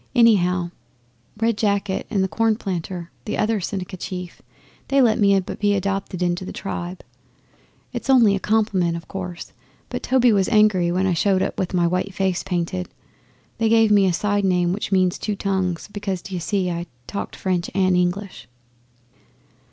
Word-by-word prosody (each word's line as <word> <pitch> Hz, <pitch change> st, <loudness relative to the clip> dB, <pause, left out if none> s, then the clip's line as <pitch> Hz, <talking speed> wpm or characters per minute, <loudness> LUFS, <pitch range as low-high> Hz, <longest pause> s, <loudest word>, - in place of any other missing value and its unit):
'Anyhow, 180 Hz, -7 st, +4 dB, 0.7 s
Red 225 Hz, -1 st, +1 dB
Jacket 200 Hz, -2 st, 0 dB
and 195 Hz, -3 st, +1 dB
Cornplanter, 190 Hz, -6 st, -2 dB, 0.2 s
the 210 Hz, -, -2 dB
other 215 Hz, -1 st, +1 dB
Seneca 185 Hz, 0 st, -4 dB
chief, 180 Hz, -1 st, -6 dB, 0.5 s
they 275 Hz, 0 st, +2 dB
let 240 Hz, -3 st, +4 dB
me 200 Hz, -2 st, +5 dB
be 205 Hz, +2 st, -1 dB
adopted 195 Hz, -2 st, -2 dB
into 175 Hz, +1 st, 0 dB
the -, -, -6 dB
tribe. 180 Hz, -2 st, -5 dB, 0.9 s
It's -, -, -5 dB
only 235 Hz, -7 st, +6 dB
a -, -, -2 dB
compliment, 195 Hz, -6 st, +1 dB
of 170 Hz, -, -10 dB
course, 180 Hz, -2 st, -7 dB, 0.4 s
but -, -, -4 dB
Toby 250 Hz, -3 st, +3 dB
was 195 Hz, -2 st, +2 dB
angry 210 Hz, -6 st, +4 dB
when 185 Hz, +2 st, +1 dB
I 185 Hz, -, +2 dB
showed 190 Hz, +3 st, +2 dB
up -, -, -3 dB
with 185 Hz, 0 st, -2 dB
my 175 Hz, -1 st, +3 dB, 0.2 s
face 190 Hz, -2 st, -1 dB
painted. 170 Hz, -, -3 dB, 0.7 s
They 225 Hz, -1 st, +2 dB
gave 225 Hz, -1 st, +4 dB
me 200 Hz, -2 st, +5 dB
a -, -, +3 dB
side 205 Hz, +3 st, 0 dB
name 180 Hz, -2 st, +2 dB
which 205 Hz, 0 st, -4 dB
means 185 Hz, -2 st, +2 dB
"Two 210 Hz, -, -2 dB
Tongues," 190 Hz, -4 st, -1 dB
because, 195 Hz, -3 st, -3 dB
d'ye 185 Hz, -2 st, -5 dB
see, 185 Hz, 0 st, -1 dB
I 170 Hz, +1 st, -4 dB, 0.2 s
talked 200 Hz, -, -5 dB
French 180 Hz, -2 st, -1 dB
and 185 Hz, -2 st, +3 dB
English. 180 Hz, +2 st, -2 dB
190 Hz, 160 wpm, -22 LUFS, 180-205 Hz, 0.9 s, only